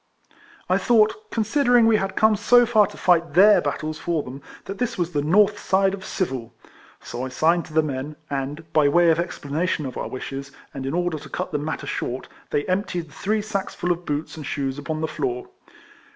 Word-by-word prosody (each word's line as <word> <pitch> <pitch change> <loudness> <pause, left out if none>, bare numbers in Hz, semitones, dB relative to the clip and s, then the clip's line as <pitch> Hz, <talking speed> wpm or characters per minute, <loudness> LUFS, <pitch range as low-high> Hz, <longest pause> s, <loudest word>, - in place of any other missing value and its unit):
I - - +2
thought, 240 - +2
considering 240 +1 +3
we 225 -1 +5
had 195 -2 -3
come 220 0 +4
so 245 +4 +5
far 220 -3 +4
to - - -12
fight 170 -4 +2
their 205 +3 +7
battles 155 +2 -3
for 165 -4 -1
them, 130 +2 -9 0.2
that 195 0 -7
this 240 -1 -1
was 175 -1 -1
the 145 - 0
north 205 +7 +3
side 195 0 +2
of 195 -1 -6
civil; 130 -14 -3 0.5
so 120 - -6
I 130 - -3
signed 165 +6 +2
to - - -13
the 160 0 +4
men, 145 +1 -4
and, 145 +3 -5
by 150 -2 +4
way 170 +2 +5
of 160 - +1
explanation 165 -1 -2
of 130 - -6
our - - -3
wishes, 135 +1 -6 0.2
and 135 -1 -5
in 140 - -2
order 175 -3 -1
to - - -12
cut 185 0 -4
the 150 - -1
matter 155 +2 -4
short, 125 +2 -4 0.2
they 145 - 0
emptied 180 -3 -2
the - - -18
three 210 +1 -1
sacksful 195 -4 -2
of 175 0 -2
boots 145 +1 -3
and 155 - -7
shoes 135 -1 -3
upon 155 +2 -4
the 160 - 0
floor. 125 -5 -3
165 Hz, 210 wpm, -23 LUFS, 145-200 Hz, 0.5 s, their